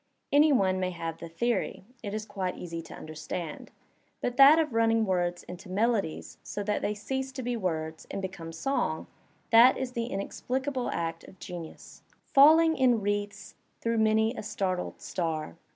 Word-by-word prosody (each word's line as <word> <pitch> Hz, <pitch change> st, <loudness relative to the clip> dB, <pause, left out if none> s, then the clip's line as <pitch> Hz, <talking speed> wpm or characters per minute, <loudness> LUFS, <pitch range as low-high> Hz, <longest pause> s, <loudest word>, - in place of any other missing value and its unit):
Any 295 Hz, +2 st, +6 dB
one 190 Hz, -8 st, +2 dB
may 185 Hz, -1 st, 0 dB
have 165 Hz, -2 st, -5 dB
the 170 Hz, -, -8 dB
theory 195 Hz, +1 st, -1 dB
— 250 Hz, -, -34 dB
it 205 Hz, -, -5 dB
is 215 Hz, +1 st, -4 dB
quite 185 Hz, -3 st, -3 dB
easy 165 Hz, -1 st, -5 dB
to -, -, -11 dB
understand. 155 Hz, +1 st, -6 dB, 0.5 s
But 245 Hz, -, -2 dB
that 300 Hz, +2 st, +7 dB
running 225 Hz, 0 st, +3 dB
of -, -, +2 dB
words 175 Hz, -2 st, 0 dB
into 180 Hz, +2 st, -10 dB
melodies 205 Hz, -3 st, -1 dB
so 205 Hz, -, -5 dB
that 210 Hz, +1 st, -1 dB
they 210 Hz, -, -1 dB
cease 265 Hz, +5 st, -3 dB
to 260 Hz, -1 st, -5 dB
be 245 Hz, 0 st, -1 dB
words 160 Hz, -6 st, -3 dB
and -, -, -4 dB
become 185 Hz, -4 st, -6 dB
song 270 Hz, +12 st, -1 dB, 0.2 s
— -, -, -37 dB
that 235 Hz, +3 st, +7 dB
is 260 Hz, -1 st, -3 dB
the 235 Hz, -2 st, -3 dB
inexplicable 255 Hz, +5 st, -3 dB
act 165 Hz, 0 st, -3 dB
of 190 Hz, -, -15 dB
genius. 175 Hz, -2 st, -9 dB, 0.2 s
Falling 320 Hz, +3 st, +6 dB
in 250 Hz, -3 st, +4 dB
wreaths 205 Hz, 0 st, -3 dB, 0.3 s
through 230 Hz, -1 st, 0 dB
many 220 Hz, +1 st, +3 dB
a -, -, -6 dB
startled 195 Hz, -4 st, -3 dB
star. 160 Hz, -4 st, -3 dB
205 Hz, 175 wpm, -29 LUFS, 175-245 Hz, 0.5 s, that